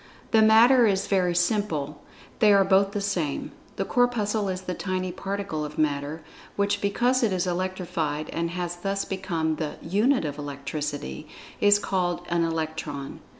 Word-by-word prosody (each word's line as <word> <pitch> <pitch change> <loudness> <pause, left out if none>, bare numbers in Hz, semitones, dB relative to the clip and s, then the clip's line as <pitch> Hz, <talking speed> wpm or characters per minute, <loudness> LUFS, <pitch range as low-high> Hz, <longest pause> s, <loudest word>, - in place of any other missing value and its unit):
The 220 - +5
matter 230 +3 +6
is 195 -2 +1
very 180 -3 +1
simple. 170 -6 0 0.4
They 215 -2 +6
are 200 -1 +6
both 195 +1 +3
the 205 - -3
same. 180 -8 -2 0.2
The - - -2
Corpuscle 220 -4 +1
is 185 0 -3
the 185 -1 -4
tiny 185 0 -3
particle 195 -5 -4
of 150 +1 -7
Matter, 150 +1 -1 0.3
which 200 0 0
because 245 +6 +2
it 225 -4 +2
is 185 -1 0
electrified 175 -4 -2
and 170 0 -2
has 175 0 -4
thus 195 +2 -2
become 170 -5 -2
the 155 -2 -3
"unit 210 - +1
of 145 0 -4
electricity," 145 +1 -5 0.3
is 205 0 +6
called 180 -3 -1
an 170 -1 +1
"Electron." 160 -3 -4
185 Hz, 155 wpm, -26 LUFS, 155-200 Hz, 0.4 s, matter